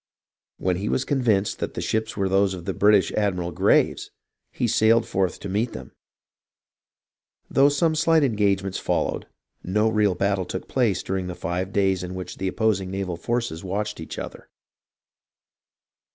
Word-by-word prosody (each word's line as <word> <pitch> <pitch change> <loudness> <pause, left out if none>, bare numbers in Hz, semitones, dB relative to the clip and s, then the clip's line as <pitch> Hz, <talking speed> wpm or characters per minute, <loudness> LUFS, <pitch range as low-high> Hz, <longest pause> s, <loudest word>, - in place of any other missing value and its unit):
When 90 -1 0
he 100 +3 -3
was 130 - 0
convinced 115 -8 +1
that - - -4
the - - -3
ships 110 -1 -2
were 100 -1 +1
those 95 0 +2
of 85 -2 -9
the 95 - -2
British 105 0 +4
admiral 90 -5 -1
Graves, 75 - +2 0.4
he 120 - -1
sailed 115 0 +4
forth 95 -3 -1
to - - -5
meet 105 +5 -1
them; 65 0 -9 1.6
though 140 +1 +5
some 160 +3 +2
slight 160 0 +3
engagements 100 -6 +1
followed, - - -1 0.4
no 105 +4 +1
real 105 -3 +2
battle 100 -1 0
took 95 - -6
place 115 -8 +1
during 95 -1 -2
the 90 - -5
five 90 +3 -3
days 95 -2 +1
in 90 0 -6
which 90 -1 -7
the 95 - -1
opposing 95 -2 0
naval 95 -2 -3
forces 115 -3 -2
watched 105 +2 -3
each 80 - -7
other. - - -8
100 Hz, 160 wpm, -24 LUFS, 95-110 Hz, 1.6 s, though